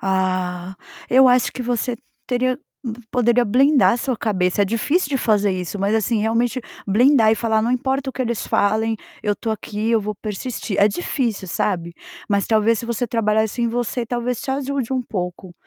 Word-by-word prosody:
Ah, 185 -1 -1 0.3
eu 260 +1 +7
acho 250 0 +3
que 255 - -5
você 240 0 -1 0.3
teria 255 +1 0 0.5
poderia 240 0 +3
blindar 265 +5 +4
a - - -1
sua 255 0 -2
cabeça, 195 -3 +1
é - - +4
difícil 275 - 0
de 270 - +1
fazer 210 -3 +2
isso, 185 +1 -4
mas 200 +2 +1
assim 220 0 0
realmente 235 +3 0 0.3
blindar 225 +2 +5
e - - +4
falar 220 -1 +1
não 235 +3 0
importa 265 +2 -1
o - - -18
que 260 - -2
eles 235 -2 -2
falem, 220 +2 +1 0.3
eu 210 - +1
estou 225 - -4
aqui, 215 +1 -3
eu 225 - +3
vou 210 +1 -4
persistir, 215 0 -5
é 205 - +7
difícil 225 - -2
sabe, 170 +1 -1 0.4
mas 200 -2 +1
talvez 220 0 +3
se 235 - -5
você 235 +1 -1
trabalhasse 220 0 0
em 235 - +2
você, 240 0 -2
talvez 245 0 -2
te - - -4
ajude 270 -2 -2
um 255 -1 0
pouco, 180 -4 -5
225 Hz, 190 wpm, -21 LUFS, 205-250 Hz, 0.5 s, eu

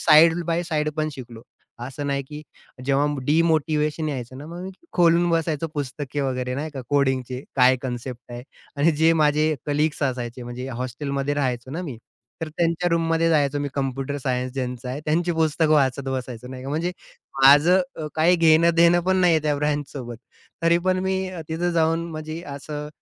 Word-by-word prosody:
Side 165 +2 +6
by 170 +1 0
side 155 -2 -1
पण 155 0 0
शिकलो. 120 -4 -10 0.4
असं 135 +3 -5
नाही 140 0 -1
की 150 0 -7 0.4
जेव्हा 140 +2 +2 0.2
डिमोटिव्हेशन 155 -1 +1
यायचं 130 -2 -5
ना, 145 - -9
मग 170 +2 -8
मी 190 - -6 0.2
खोलून 175 0 +4
बसायचो 165 -1 0
पुस्तके 145 0 -4
वगैरे, 125 -2 -2
नाही 150 +4 -4
का, 140 -3 -6
कोडिंगचे 130 -2 0
काय 130 0 +6
कन्सेप्ट 125 -1 -6
आहे 120 0 -7 0.3
आणि 145 +4 +4
जे 160 +2 +4
माझे 155 0 +2
कलीग्स 150 +1 0
असायचे 125 -2 -2
म्हणजे 120 +2 -6
हॉस्टेलमध्ये 140 +3 -2
राहायचो 130 -3 -2
ना 165 +6 -4
मी, 140 -9 -6 0.5
तर 160 - -2
त्यांच्या 170 +2 0
रूममध्ये 165 0 +2
जायचो, 145 -2 +2
मी 145 - -2
कॉम्प्युटर 135 0 -2
सायन्स 125 -1 -2
ज्यांचं 125 -1 -4
आहे, 130 +3 -4
त्यांची 175 +3 +1
पुस्तकं 160 -1 +2
वाचत 135 -1 +1
बसायचो, 125 -2 -5
नाही 130 0 -8
का, 135 - -5
म्हणजे 165 +4 -1 0.5
माझं 145 +7 +7 0.2
अ, 155 - -4
काही 170 +3 +4
घेणं-देणं 170 +1 +5
पण 190 +1 +2
नाहीये 170 -3 +4
त्या 150 -1 +1
ब्रांचसोबत, 145 -4 -3 0.5
तरी 170 +1 +4
पण 185 0 +3
मी 190 0 0
अ, 185 -2 -7
तिथं 170 +2 -1
जाऊन 165 0 +1
म्हणजे 155 +1 -6 0.2
असं 150 +1 -6
150 Hz, 170 wpm, -23 LUFS, 130-165 Hz, 0.5 s, माझं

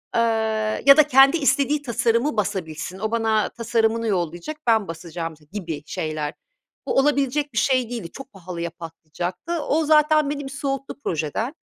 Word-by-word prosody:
eee, 230 - +4 0.6
ya 280 +1 +9
da 300 -1 +6
kendi 270 +4 +6
istediği 285 0 +2
tasarımı 235 0 0
basabilsin. 185 -2 -3
O, 220 +1 -2
bana 220 -2 +1
tasarımını 230 0 0
yollayacak, 175 - -2
ben 220 -3 +3
basacağım 165 0 -6 0.2
gibi 165 -8 -5
şeyler. 155 -1 -3 0.5
Bu, - - 0
olabilecek 285 0 +1
bir 230 - -6
şey 255 -1 +2
değildi, 230 -9 -6
çok 270 0 -10
pahalıya 170 -2 -5
patlayacaktı. 170 - -7
O, 315 +2 +1
zaten 305 -1 +4
beni 290 0 -3
bir 270 - -7
soğuttu 275 0 -4
projeden. 165 - -2
230 Hz, 150 wpm, -23 LUFS, 175-275 Hz, 0.6 s, ya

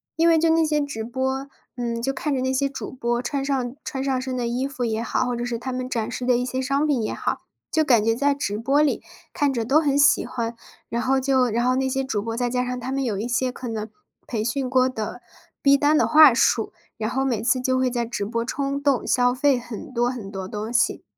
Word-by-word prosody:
因 330 +1 +4
为 325 -1 +5
就 330 0 +3
那 325 0 +3
些 305 -1 +1
直 280 -7 -3
播， 265 +3 -2 0.3
嗯， 235 -1 -3
就 270 +3 -1
看 295 +2 -2
着 265 - 0
那 260 +1 0
些 275 +1 +1
主 275 - -6
播 240 -1 -2
穿 270 +3 -2
上 265 -3 -1
穿 265 - -4
上 265 -1 0
身 260 -1 -4
的 240 -1 -1
衣 245 +3 -1
服 275 -3 -3
也 225 0 -1
好， - - 0
或 245 -1 -1
者 240 - -3
是 240 -1 -3
他 260 +2 -4
们 255 0 -4
展 230 -2 -2
示 245 +1 -4
的 250 -1 +3
一 245 - -1
些 255 +1 -2
商 275 +3 +1
品 265 -7 +1
也 - - -2
好， - - -2 0.3
就 315 - +2
感 245 -7 +4
觉 225 0 +2
在 285 +4 +2
直 210 -8 -3
播 275 +6 +2
里 300 - +1 0.3
看 290 -4 +1
着 235 -4 -2
都 290 +7 +4
很 285 -2 +1
喜 290 - +5
欢。 235 -2 -4 0.3
然 235 - -2
后 265 +1 +2
就 260 -1 +2
然 235 +2 0
后 255 0 +3
那 265 0 0
些 270 +1 0
主 215 -6 -1
播， 225 +2 -4
再 245 0 0
加 250 0 0
上 250 0 -3
他 255 +2 -4
们 275 0 -1
有 220 -6 -1
一 230 - -2
些 250 +1 0
可 250 0 -7
能 220 -1 -4 0.4
培 225 -3 -3
训 255 +3 -1
过 255 -1 +3
的 235 -1 -5 0.4
逼 280 0 +6
单 295 +2 +3
的 - - +3
话 305 -4 +8
术， 230 -2 +2 0.3
然 220 0 -2
后 265 +1 0
每 235 -5 0
次 255 +2 +2
就 255 0 +1
会 255 -1 +1
在 240 -1 -1
直 225 -3 -4
播 230 +3 -2
冲 275 +3 -2
动 280 -4 +1
消 245 0 +3
费 275 -1 +2
很 245 +4 -8
多 240 0 +1
很 230 -6 -6
多 190 -2 -5
东 210 +3 -5
西。 245 0 +1
255 Hz, 280 characters per minute, -23 LUFS, 235-275 Hz, 0.4 s, 话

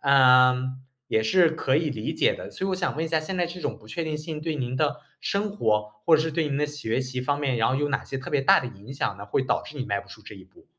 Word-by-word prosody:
嗯， 130 -1 +5 0.3
也 110 - +2
是 170 +9 +4
可 145 -4 +1
以 155 -2 0
理 110 -5 -4
解 - - +3
的。 - - -8
所 190 - -4
以 - - 0
我 - - +1
想 180 - -1
问 160 - -1
一 - - -4
下， 160 -1 +2
现 185 +4 -4
在 175 -1 +1
这 175 +1 -8
种 - - -3
不 110 - -18
确 165 +7 -3
定 155 -1 -2
性 155 0 -6
对 160 -1 -2
您 130 -2 -3
的 150 0 0 0.2
生 205 +1 -1
活， 105 - 0 0.2
或 160 - +7
者 155 - +1
是 160 - -2
对 160 +1 0
您 140 - -1
的 150 - +1
学 135 -5 -2
习 130 -1 -4
方 145 +3 0
面， 135 -4 0
然 115 - +3
后 130 - +1
有 145 +2 0
哪 140 - -1
些 135 - -5
特 130 - -7
别 145 - +2
大 135 - +6
的 125 - -5
影 110 +4 -11
响 100 -7 -2
呢？ 100 - -8
会 130 - 0
导 - - 0
致 150 - -11
你 130 - -3
迈 100 -1 -1
不 - - -17
出 - - -13
这 - - -10
一 - - -13
步。 - - -22
140 Hz, 335 characters per minute, -26 LUFS, 125-160 Hz, 0.3 s, 或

